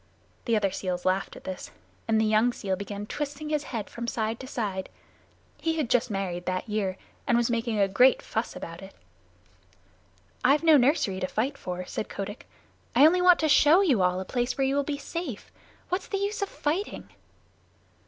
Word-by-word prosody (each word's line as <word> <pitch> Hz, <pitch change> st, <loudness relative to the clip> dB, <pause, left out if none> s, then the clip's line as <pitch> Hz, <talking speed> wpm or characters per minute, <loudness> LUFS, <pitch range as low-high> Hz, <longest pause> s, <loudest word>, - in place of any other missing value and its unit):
The 230 Hz, -, +2 dB
other 200 Hz, -3 st, +1 dB
seals 180 Hz, -2 st, -3 dB
laughed 185 Hz, +1 st, 0 dB
at -, -, -12 dB
this, 185 Hz, -1 st, -6 dB, 0.4 s
and 220 Hz, -1 st, +3 dB
the 220 Hz, -, +3 dB
young 220 Hz, +3 st, +3 dB
seal 190 Hz, -4 st, -2 dB
began 200 Hz, +1 st, -6 dB
twisting 295 Hz, +5 st, -5 dB
his 300 Hz, -1 st, -1 dB
head 220 Hz, -5 st, -4 dB
from 235 Hz, 0 st, -6 dB
side 225 Hz, 0 st, -2 dB
to 260 Hz, -, -8 dB
side. 200 Hz, -7 st, -3 dB, 0.7 s
He 325 Hz, 0 st, 0 dB
had 275 Hz, -6 st, -1 dB
just 250 Hz, 0 st, +3 dB
married 185 Hz, -3 st, -3 dB
that 185 Hz, +3 st, -2 dB
year, 200 Hz, -3 st, -1 dB, 0.3 s
and 235 Hz, -, +4 dB
was 240 Hz, 0 st, +1 dB
making 230 Hz, -1 st, -1 dB
a 200 Hz, -1 st, +4 dB
great 250 Hz, +7 st, +5 dB
fuss 220 Hz, +2 st, -3 dB
about 165 Hz, +2 st, -8 dB
it. 195 Hz, 0 st, -12 dB, 1.5 s
"I've 280 Hz, +5 st, +4 dB
no 320 Hz, -2 st, +7 dB
nursery 245 Hz, -, +3 dB
to 185 Hz, -, -1 dB
fight 250 Hz, +9 st, -1 dB
for," 180 Hz, -6 st, -5 dB
said 215 Hz, -, -5 dB
Kotick. 205 Hz, +2 st, -6 dB, 0.5 s
"I 285 Hz, -, +8 dB
only 360 Hz, +3 st, +5 dB
want 360 Hz, -1 st, +7 dB
to 315 Hz, -, +2 dB
show 305 Hz, +4 st, +6 dB
you 275 Hz, -, +3 dB
all 180 Hz, 0 st, +2 dB
a 190 Hz, -, -4 dB
place 245 Hz, +5 st, -1 dB
where 270 Hz, -, +2 dB
you 270 Hz, +1 st, +1 dB
will 285 Hz, -, +3 dB
be 285 Hz, 0 st, -3 dB
safe. 285 Hz, -, -6 dB, 0.4 s
What's 365 Hz, +2 st, -2 dB
the 400 Hz, -, -2 dB
use 405 Hz, +2 st, -2 dB
of 400 Hz, -, -1 dB
fighting?" 335 Hz, +8 st, -3 dB
235 Hz, 195 wpm, -27 LUFS, 195-290 Hz, 1.5 s, I